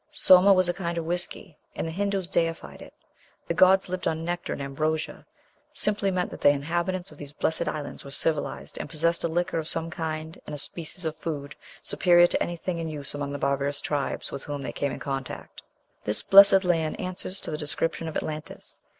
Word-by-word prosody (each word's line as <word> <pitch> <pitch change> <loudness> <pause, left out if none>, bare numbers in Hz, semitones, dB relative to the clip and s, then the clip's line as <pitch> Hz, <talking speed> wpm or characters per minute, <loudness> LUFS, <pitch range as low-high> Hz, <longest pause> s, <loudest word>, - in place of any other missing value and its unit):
Soma 190 -8 +7
was 185 -2 +5
a 175 - +1
kind 170 -2 -3
of 165 - -2
whiskey, 175 0 -4 0.2
and - - -2
the - - -3
Hindoos 195 0 -1
deified 165 -1 -1
it. - - -12 0.5
"The - - 0
gods 190 +1 +5
lived 185 0 -3
on 160 0 -1
nectar 175 0 -3
and - - -3
ambrosia" 155 +3 -2 0.5
simply 205 -1 +1
meant 180 -1 -1
that - - -9
the - - +7
inhabitants 175 +6 -1
of - - -15
these 145 0 -8
blessed 160 +1 -1
islands 150 -2 -4
were 140 - -9
civilized, 150 +2 -2
and - - -5
possessed 170 +2 +1
a - - +2
liquor 170 0 0
of 155 - -4
some 165 0 -2
kind 160 0 -4
and 150 - -4
a - - -6
species 170 +4 -7
of 160 -1 -2
food 145 -3 -5 0.3
superior 175 -1 +5
to - - 0
anything 175 0 -2
in 165 -1 -3
use 145 -3 -4
among 145 -1 -3
the 145 - -3
barbarous 140 +1 0
tribes 145 -2 -2
with - - -5
whom 145 -1 -4
they - - -3
came 140 - -1
in - - -5
contact. 135 -2 -5 0.4
This 105 - -1
blessed 195 0 +8
land 165 -3 +1
answers 185 +1 -5
to - - -5
the 155 - -2
description 165 +2 -2
of 160 - -3
Atlantis. 155 0 -6
165 Hz, 205 wpm, -27 LUFS, 150-180 Hz, 0.5 s, blessed